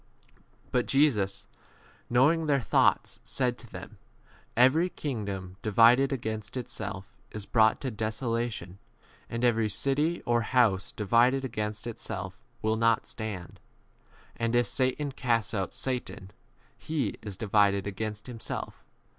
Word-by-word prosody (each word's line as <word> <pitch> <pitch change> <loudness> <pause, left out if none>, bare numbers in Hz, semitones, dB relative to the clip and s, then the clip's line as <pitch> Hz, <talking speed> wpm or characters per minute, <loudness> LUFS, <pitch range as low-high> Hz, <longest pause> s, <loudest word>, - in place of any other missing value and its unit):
But 125 -1 +1
Jesus, 115 -9 +2 0.6
knowing 150 +7 +3
their 140 -2 +3
thoughts, 120 - +2
said 125 -2 0
to 120 - -14
them, 95 +3 -9 0.6
Every 145 +9 +5
kingdom 100 - -5
di 110 - -2
vided 120 +6 +6
against 110 -2 -4
itself 100 -5 -5 0.2
is 105 -2 -6
brought 110 -1 +4
to 130 - -2
desolation, 110 -3 -3 0.5
and 115 +1 -3
every 115 -2 +2
city 145 - 0
or 120 0 +2
house 110 -5 +2
divided 120 +6 +3
against 105 -3 -4
itself 100 -5 -5 0.3
will 110 +1 +1
2d - - -4
not 115 -1 +3
stand. 100 -6 -6 0.8
And 115 0 -1
if 120 0 +4
Satan 130 +2 0
casts 120 -5 0
out 95 -3 -1
Satan, 125 -7 -4 0.4
he 145 -9 -3
is 100 -3 -7
divided 100 -2 +2
against 105 +1 -4
himself. 120 -3 -6
115 Hz, 130 wpm, -28 LUFS, 105-130 Hz, 0.8 s, vided